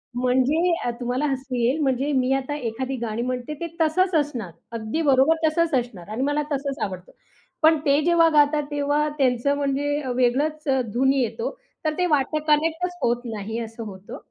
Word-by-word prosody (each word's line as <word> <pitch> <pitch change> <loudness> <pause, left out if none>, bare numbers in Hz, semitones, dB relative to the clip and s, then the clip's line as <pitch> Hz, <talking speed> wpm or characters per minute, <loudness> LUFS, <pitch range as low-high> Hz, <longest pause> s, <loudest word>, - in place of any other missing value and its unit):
म्हणजे 260 +8 +2
अ, - - +1
तुम्हाला 250 +3 -1
हसू 265 -2 -3
येईल, 245 +5 +1
म्हणजे 270 +1 +1
मी 255 +1 0
आता 270 +2 -2
एखादी 260 0 -3
गाणी 220 +1 -3
म्हणते 250 +3 -3
ते 340 - -2
तसंच 360 +3 +2
असणार. 255 - -1 0.2
अगदी 230 +7 -3
बरोबर, 270 +5 +5
तसंच 330 +1 +1
असणार 210 -7 -8
आणि 220 +4 -3
मला 290 +1 0
तसंच 280 0 -2
आवडतं. 185 -2 -6 0.5
पण 315 0 +6
ते 285 +1 +4
जेव्हा 340 -1 +5
गातात, 295 -1 +3
तेव्हा 290 +1 +1
त्यांचं 265 0 +2
म्हणजे 285 +1 0
अ, 260 - -5
वेगळचं 275 +3 +1
अ, - - +2
धुन 265 +2 +3
येतो. 275 - -2 0.3
तर 310 - +1
ते 360 - +2
वाटतं 300 -1 +1
कनेक्टच 325 +4 +1
होत 240 0 +1
नाही 220 0 -4
असं 225 0 -6
होतं. 195 -2 -9
270 Hz, 175 wpm, -24 LUFS, 245-300 Hz, 0.5 s, पण